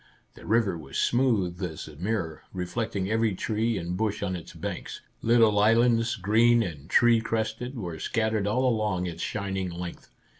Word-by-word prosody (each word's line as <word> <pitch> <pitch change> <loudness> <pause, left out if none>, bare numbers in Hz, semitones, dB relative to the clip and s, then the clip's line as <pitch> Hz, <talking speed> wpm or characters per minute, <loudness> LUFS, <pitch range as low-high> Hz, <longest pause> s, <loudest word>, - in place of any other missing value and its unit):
The - - -13
river 105 -6 +2
was 70 -3 -7
smooth 105 -8 +1
as 85 -4 -5
a 80 - -11
mirror, 90 -2 -3
reflecting 95 +2 -2
every 110 -1 +1
tree 110 +2 -1
and 85 0 -3
bush 105 +1 -1
on 95 -2 -1
its 85 - -8
banks. - - -6 0.2
Little 115 -3 +4
islands, 115 +2 +3
green 115 +3 +4
and 80 -5 -7
tree 120 +1 +5
crested, 115 +3 -3
were 85 -7 -5
scattered 110 0 0
all 125 +5 +2
along 105 -6 0
its 85 -1 -5
shining 95 -3 -2
length. 85 0 -7
105 Hz, 160 wpm, -27 LUFS, 90-115 Hz, 0.2 s, tree